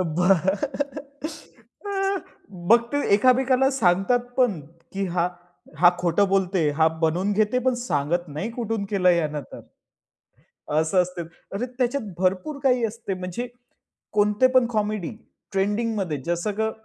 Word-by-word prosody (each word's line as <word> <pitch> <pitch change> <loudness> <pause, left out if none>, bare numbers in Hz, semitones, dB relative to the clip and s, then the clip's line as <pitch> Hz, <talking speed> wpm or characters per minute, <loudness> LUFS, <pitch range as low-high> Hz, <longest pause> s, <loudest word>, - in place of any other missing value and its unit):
मग 275 - -1
ते 285 - +1
एकामेकाला 255 +3 +4
सांगतात 210 -1 +2 0.2
पण, 240 -10 +2
की 170 +6 -7
हा 175 0 0 0.5
हा 175 +1 +7
खोटं 180 +3 +2
बोलत 195 -1 +1
आहे, 160 -5 +2
हा 160 +2 +3 0.2
बनवून 180 +6 +1
घेते, 215 +4 +2
पण 255 0 +1
सांगत 175 - -1
नाही 155 +10 -4
कुठून 225 -3 -2
केलं 185 -3 +4
यानं 155 -4 0
तर, - - -8 1.2
असं 180 +3 +3
असते. 180 0 -5 0.3
अरे, 225 +5 -2
त्याच्यात 250 +1 0 0.2
भरपूर 190 +11 0
काही 250 -3 +3
असते. 220 -3 -3
म्हणजे 185 +6 -5 0.7
कोणते 210 +4 +3
पण 255 -2 +5
कॉमेडी 210 -4 -1 0.4
ट्रेंडिंगमध्ये, 205 -3 0
जसं 175 +4 -1
का 220 0 +1
200 Hz, 125 wpm, -24 LUFS, 175-250 Hz, 1.2 s, हा